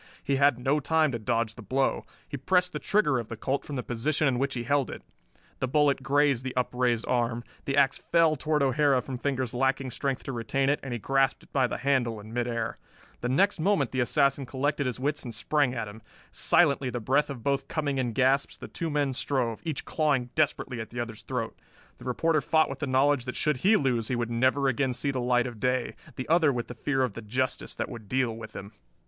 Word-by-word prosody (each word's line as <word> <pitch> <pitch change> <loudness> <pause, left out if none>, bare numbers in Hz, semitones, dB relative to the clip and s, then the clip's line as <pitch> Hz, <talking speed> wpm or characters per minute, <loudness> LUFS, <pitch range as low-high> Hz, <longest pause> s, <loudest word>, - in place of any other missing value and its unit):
He 140 - +1
had 140 -2 +4
no 135 +4 +1
time 155 +1 +2
to 120 - -3
dodge 115 0 0
the 115 - -11
blow. 130 +6 0 0.2
He - - -6
pressed 180 +6 +1
the - - -3
trigger 150 -11 +2
of 115 - -5
the 115 - -7
Colt 135 +5 -1
from 145 - -6
the 125 - -3
position 140 +6 0
in 125 -2 +1
which 140 0 -1
he 120 - -2
held 140 +2 +1
it. - - -8 0.6
The 130 - 0
bullet 145 0 +2
grazed 140 -1 +2
the 130 -1 -5
upraised 125 -2 +1
arm. 120 -1 0 0.2
The 135 0 -1
ax 135 -1 +3
fell 165 -2 +3
toward 150 0 0
O'Hara 140 0 +3
from 130 -1 -6
fingers 130 -3 -2
lacking 135 +1 0
strength 135 +1 -2
to - - -5
retain 135 +3 0
it, 145 - +2
and 135 - -7
he 120 - -1
grasped 135 +5 +1
it - - -22
by 130 -3 +3
the - - -4
handle 120 -4 0
in 110 +2 -11
midair. 120 -1 -2 0.4
The 120 - -2
next 185 +9 +2
moment 160 - +1
the 130 - -2
assassin 140 +1 +2
collected 140 +1 -1
his 125 -1 -3
wits 145 +2 -1
and 120 -4 -6
sprang 140 +2 +1
at 115 -3 -3
him. 105 +2 -10 0.3
Silently, 140 -6 +3
the 120 - -3
breath 130 +7 +1
of 130 -5 -7
both 140 +1 0
coming 145 -4 -1
in 120 -3 -1
gasps, 135 +3 +2
the - - -8
two 165 - -4
men 145 -3 0
strove, 125 -4 -1
each 160 -4 -3
clawing 140 -6 0
desperately 135 -5 0
at 110 - -7
the 120 - -6
other's 115 -2 -5
throat. 125 -3 -4 0.4
The - - -12
reporter 155 +5 +1
fought 160 +2 +2
with - - -7
the 145 - -2
knowledge 135 0 +2
that 125 - -4
should 150 -3 +1
he 200 - +4
lose 120 -5 0
he 130 - -1
would 120 -1 -2
never 130 +4 +2
again 130 0 +1
see 140 +3 -1
the 130 -2 -2
light 125 0 +2
of 120 -3 -6
day, 125 0 0 0.2
the 130 - -5
other 160 -3 +4
with 120 -3 -4
the - - -5
fear 135 +1 0
of 125 -5 -1
the 115 - -7
justice 125 +5 -2
that - - -2
would 110 -4 -10
deal 125 -2 0
with 110 -1 -10
him. 100 +1 -8
130 Hz, 235 wpm, -28 LUFS, 120-145 Hz, 0.6 s, had